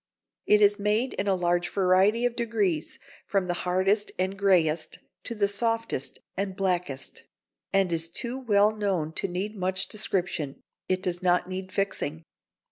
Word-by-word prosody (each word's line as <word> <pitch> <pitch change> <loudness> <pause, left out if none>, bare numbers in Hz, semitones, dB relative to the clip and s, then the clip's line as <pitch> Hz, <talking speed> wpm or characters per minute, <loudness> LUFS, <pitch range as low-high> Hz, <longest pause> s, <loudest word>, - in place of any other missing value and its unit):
It 210 0 +6
is 205 +1 +5
made 215 +5 +1
in 205 - -2
a 195 - +3
large 175 -1 +1
variety 195 +5 +3
of 245 -1 0
degrees, 210 -10 -1 0.3
from 195 -2 +1
the 175 - -1 0.2
hardest 195 +3 +2
and 190 +1 -1
greyest 175 -5 +2 0.3
to 235 - -4
the 205 -2 +2
softest 225 - -1 0.2
and 195 0 -2
blackest, 180 -8 -2 0.5
and 195 -2 +2
is 165 0 0
too 240 +8 -2
well 210 -3 +3
known 185 -7 -1
to - - -1
need 195 +4 -3
much 190 0 0
description. 180 -9 -2 0.3
It 185 0 0
does 180 -1 -2
not 180 -1 +2
need 185 0 -5
fixing. 165 -5 -2
190 Hz, 155 wpm, -27 LUFS, 180-210 Hz, 0.5 s, It